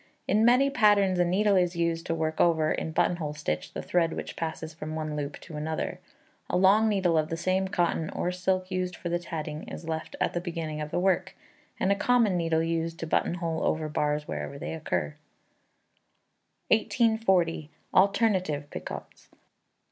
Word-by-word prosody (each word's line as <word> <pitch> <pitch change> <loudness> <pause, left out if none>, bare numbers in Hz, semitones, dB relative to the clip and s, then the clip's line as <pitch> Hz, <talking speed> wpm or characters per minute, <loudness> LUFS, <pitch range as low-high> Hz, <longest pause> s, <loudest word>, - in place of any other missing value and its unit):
In 210 +3 +3
many 250 +4 +5
patterns 200 -6 +4
a - - +5
needle 200 +4 +2
is 180 -1 +2
used 170 -1 -1
to 165 - 0
work 160 -1 -1
over, 160 -2 +3
in 160 - -2
buttonhole 160 -2 0
stitch, 145 - -3
the - - -5
thread 170 -2 +1
which - - -6
passes 160 -1 -4
from 155 0 -6
one 155 -1 -3
loop 145 -1 -4
to 160 -3 -9
another. 155 +1 -3 0.5
A - - +1
long 200 +4 +5
needleful 185 -6 +2
of 155 0 -1
the 165 - -2
same 185 +2 +1
cotton 170 -3 0
or 180 - -2
silk 185 +1 -1
used 185 -1 -2
for 175 - -5
the 175 0 0
tatting 155 -3 -5
is 165 - -8
left 160 -1 -4
at - - 0
the 175 - -1
beginning 165 -3 -4
of 150 - -4
the 165 - -2
work, 185 0 +1 0.4
and 190 - +2
a - - +4
common 230 -2 +3
needle 165 -2 +1
used 165 0 -2
to 165 - -4
buttonhole 165 0 -1
over 155 0 0
bars 150 0 -1
wherever 75 - -5
they 140 - -5
occur. 160 -1 -2 1.6
1840. 210 - +2 0.2
Alternative 185 -7 +2
Picots. - - -8
170 Hz, 175 wpm, -28 LUFS, 160-190 Hz, 1.6 s, many